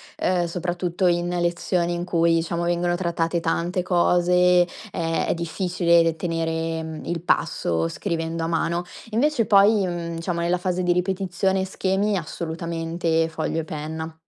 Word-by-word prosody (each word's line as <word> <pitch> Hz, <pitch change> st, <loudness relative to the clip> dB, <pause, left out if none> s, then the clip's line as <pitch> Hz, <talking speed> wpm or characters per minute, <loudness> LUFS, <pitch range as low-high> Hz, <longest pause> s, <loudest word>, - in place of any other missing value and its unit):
ehm, 180 Hz, -1 st, +1 dB
soprattutto 175 Hz, +1 st, -1 dB
in 175 Hz, 0 st, +1 dB
lezioni 175 Hz, 0 st, 0 dB
in 175 Hz, +1 st, -3 dB
cui 170 Hz, -1 st, +2 dB
diciamo 170 Hz, +1 st, -1 dB
vengono 175 Hz, 0 st, +1 dB
trattate 170 Hz, -1 st, -1 dB
tante 175 Hz, +2 st, -1 dB
cose 180 Hz, 0 st, +4 dB, 0.2 s
è 165 Hz, -3 st, -1 dB
è -, -, +2 dB
difficile 170 Hz, -1 st, +2 dB
tenere, 165 Hz, -1 st, -2 dB
mhmm, 160 Hz, -1 st, -7 dB
il 170 Hz, -1 st, -3 dB
passo 85 Hz, -, 0 dB
scrivendo 165 Hz, -, -3 dB
a -, -, -1 dB
mano. 170 Hz, +1 st, 0 dB, 0.3 s
Invece 240 Hz, +1 st, +1 dB
poi, 200 Hz, 0 st, +5 dB
mhmm, 170 Hz, -1 st, -4 dB
diciamo 170 Hz, +1 st, -3 dB
nella 175 Hz, +1 st, +1 dB
fase 180 Hz, 0 st, -1 dB
di 175 Hz, 0 st, +2 dB
ripetizione 190 Hz, +1 st, 0 dB
e -, -, -1 dB
schemi 195 Hz, +2 st, 0 dB
assolutamente 165 Hz, 0 st, -2 dB
foglio 160 Hz, 0 st, -2 dB
e -, -, -2 dB
penna. 160 Hz, +1 st, -5 dB
170 Hz, 145 wpm, -23 LUFS, 165-180 Hz, 0.3 s, poi